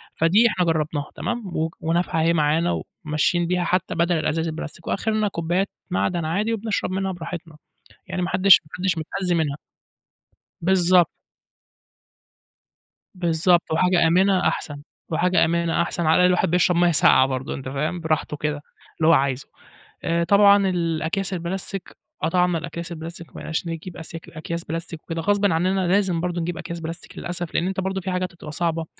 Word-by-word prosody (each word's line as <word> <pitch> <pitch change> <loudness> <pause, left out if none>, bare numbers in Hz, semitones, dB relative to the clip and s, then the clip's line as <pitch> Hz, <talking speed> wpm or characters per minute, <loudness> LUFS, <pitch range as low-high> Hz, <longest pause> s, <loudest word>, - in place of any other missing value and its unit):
فدي 195 +9 +4
إحنا 185 -4 0
جرّبناها 155 -3 -1
تمام؟ 240 0 -3 0.2
وك 160 +1 -2
ونافعه 165 0 0
اهي 165 +1 +3
معانا، 160 +2 +1 0.2
وماشيين 155 +3 +1
بيها 180 0 0
حتى 180 +1 0
بدل 170 +1 +2
الأزايز 160 +1 -1
البلاستيك، 160 +1 -7
وآخرنا 215 +1 0
كوبيات 180 +1 -1 0.2
معدن 175 -2 0
عادي 205 +8 0
وبنشرب 220 -3 -2
منها 190 0 -1
براحتنا. 170 -2 -7 0.5
يعني 185 -1 -3
ما 180 - -1
حدّش 185 +1 +6
ما 150 - -22
حدّش 185 -2 0
متأذي 180 +3 -2
منها. 150 -4 0 1.0
بالضبط. 180 -1 +4 2.1
باالضبط، 175 -1 +2
وحاجة 175 +1 +3
آمِنة 185 +2 +3
أحسن، 145 -2 -3 0.3
وحاجة 175 +2 +3
آمِنة 170 0 +1
أحسن. 170 0 -2
على 160 +1 +4
الأقل 180 - +5
الواحد 180 -2 +2
بيشرَب 180 0 +3
مَيّة 175 0 +4
ساقْعة 130 -3 +5
برضه، 130 0 -3
أنتَ 130 -1 -6
فاهم؟ 150 +6 -2
براحته 155 -2 -1
كده، 150 0 -2 0.4
اللي 160 - +3
هو 165 - +7
عايزه. 135 -3 +1 0.6
آآ، 170 0 +1
طبعًا 200 +1 +5
الأكياس 170 +2 -1
البلاستيك، 185 +2 -5 0.3
قطَعنا 180 +1 +2
الأكياس 170 +1 -6
البلاستيك. 165 0 -7
ما - - -27
بقيناش 160 +2 -4
نجِيب 165 +2 -6
أسياك 165 +1 -9
أكياس 170 +1 -5
بلاستيك 165 0 -6
وكده، 165 0 -4
غصبٍ 205 +3 +2
عننا 185 +3 +1
لازم 185 -2 +2
برضه 175 -1 -2
نجِيب 170 0 -3
أكياس 170 0 -6
بلاستيك 165 +1 -7
للأسف، 175 -1 -5
لإن 175 - +1
أنتَ 190 0 -3
برضه 190 0 -2
في 190 +1 -3
حاجات 180 -1 -2
هتبقى 150 -3 -9
صعبة. 165 +1 -1
170 Hz, 165 wpm, -23 LUFS, 160-185 Hz, 2.1 s, هو